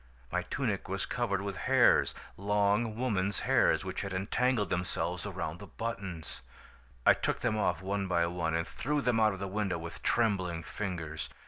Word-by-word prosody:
My - - +1
tunic - - -2
was - - -1
covered 100 0 -1
with 100 -2 -4
hairs, - - +5 0.2
long 105 +2 +1
woman's 100 -5 0
hairs - - +3
which - - -3
had 100 -1 -4
entangled 105 +2 +1
themselves 90 0 -1
around 80 +2 -4
the 100 - -9
buttons! 95 -10 -5 0.6
"I - - +9
took - - -1
them 120 -3 +1
off 105 -3 0
one 100 0 -1
by 85 -2 +2
one 85 -2 -1
and 85 0 0
threw 150 +2 -1
them 125 -4 +2
out 110 -1 +4
of 95 - -7
the 100 - -3
window 100 -2 -1
with 85 0 -7
trembling 95 -8 +1
fingers. 80 -10 -4
100 Hz, 175 wpm, -31 LUFS, 90-105 Hz, 0.6 s, I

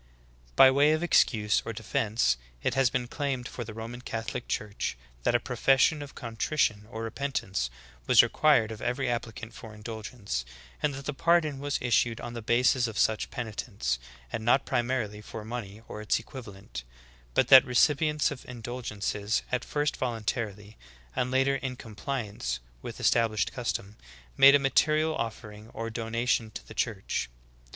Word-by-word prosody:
"'" - - -30
19. - - -29
By 130 0 +9
way 145 +3 +5
of 155 +2 0
excuse 105 -10 +3
or 115 - -4
defense, 110 - +1 0.3
it - - +1
has 135 -1 +3
been 125 0 -2
claimed 130 -2 -2
for 120 - -6
the 110 -1 -9
Roman 115 +2 -7
Catholic 115 0 -4
Church 105 - -3 0.2
that - - +2
a - - +5
profession 135 +3 +3
of 145 -1 -9
con 115 -2 -7
trition 110 -7 +1
or 110 -1 -5
repentance 115 - -2 0.4
was - - +8
required 140 -8 +3
of 110 - -8
every 125 +3 -1
applicant 115 -1 -4
for 110 -2 -10
indulgence, 110 - -5 0.4
and 145 -2 +1
that 135 0 -8
the 150 - -2
pardon 155 -2 +2
\vas 145 0 -1
issued 120 -1 +2
on 120 - -6
the 120 - -5
basis 120 +2 +3
of 110 -2 -6
such 110 -1 +2
penitence, 105 - -3 0.3
and 110 - -2
not 120 +4 +3
primarily 120 -4 -1
for 110 0 -8
money 110 -2 -6
or 105 - -7
its 105 - +1
equiv 125 +2 -9
alent; 95 - -8 0.5
but - - +3
that 130 -1 +11
recipients 150 +4 +2
of 140 - -7
indulgences, 115 -3 -3
at 125 -1 0
first 145 0 -1
voluntarily, 110 -3 -3 0.4
and 125 0 0
later 135 +1 +2
in 130 -1 -4
compliance 105 - -4 0.2
with - - -7
established 115 -3 +2
custom, 110 -4 -3 0.4
made 140 +1 +9
a - - +8
material 155 +3 +2
offering 110 -2 -6
or 115 0 -4
donation 115 0 0
to 110 - -9
the - - -10
Church. 105 - -2
115 Hz, 165 wpm, -28 LUFS, 105-130 Hz, 0.5 s, that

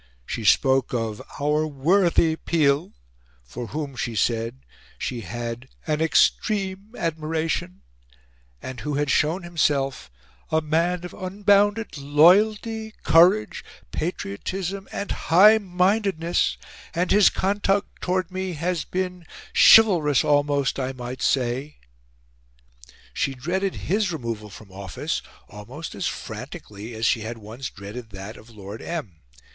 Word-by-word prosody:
She 115 - -4
spoke 130 +5 +3
of 110 -3 -3 0.2
"our 150 +2 +1
worthy 165 +3 +2
Peel," 155 -2 +1 0.5
for 115 - -7
whom, 145 +2 -5
she 120 -2 -3
said, 115 +4 -1 0.3
she 120 -2 -4
had 120 +5 -6 0.2
"an 155 -1 -1
EXTREME 195 +6 +1
admiration" 165 +2 -2 0.8
and 130 -1 -6
who 150 -1 -3
had 145 0 0
shown 165 +5 +1
himself 140 - 0 0.4
"a 160 - +2
man 170 +3 0
of 180 - -8
unbounded 205 0 +1
LOYALTY, 210 +9 +3
COURAGE 165 -10 +4 0.3
patriotism, 185 - -4
and 200 - -4
HIGH 210 +7 +6
MINDEDNESS, 185 -2 +1 0.4
and 175 +1 0
his 205 -1 +6
conduct 200 +1 -1
towards 185 0 -1
me 185 0 -3
has 170 +1 -2
been 180 -2 -4 0.3
CHIVALROUS 170 - +6
almost, 145 -1 +1
I 130 0 -2
might 125 0 -7
say." 130 +3 0 1.4
She 135 - -1
dreaded 185 +9 -2
his 200 0 +1
removal 115 -8 -5
from 100 0 -13
office 95 -1 -4 0.3
almost 120 +11 -9
as - - -2
frantically 105 +3 -7
as 110 +1 -2
she 115 -1 +2
had 115 +2 -5
once 115 +5 -7
dreaded 105 +4 -9
that 100 +2 -8
of 110 - -15
Lord 105 -1 -9
M. 145 - -5
155 Hz, 120 wpm, -24 LUFS, 120-185 Hz, 1.4 s, HIGH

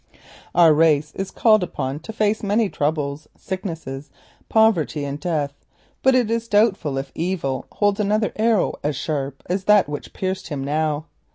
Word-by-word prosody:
Our 165 -2 +7
race 155 -1 +3
is 195 0 -4
called 215 0 +4
upon 140 -5 -3
to 195 - -8
face 215 0 0
many 210 +1 +1
troubles; 145 -1 -2
sickness, 185 -4 -5 0.6
poverty, 185 -10 +2
and 140 +1 -4
death, 150 -4 -1 0.5
but 265 0 +4
it 240 -3 +2
is 230 0 -1
doubtful 205 -10 +2
if 135 - -4
Evil 165 -6 -2
holds 205 -1 +1
another 210 +1 +1
arrow 220 -2 +2
so 150 - +1
sharp 140 -1 -4
as 185 +1 -2
that 210 -4 +5
which 145 -1 -6
pierced 190 0 -3
him 140 -3 -4
now. 150 +1 -1
170 Hz, 160 wpm, -22 LUFS, 145-210 Hz, 0.6 s, Our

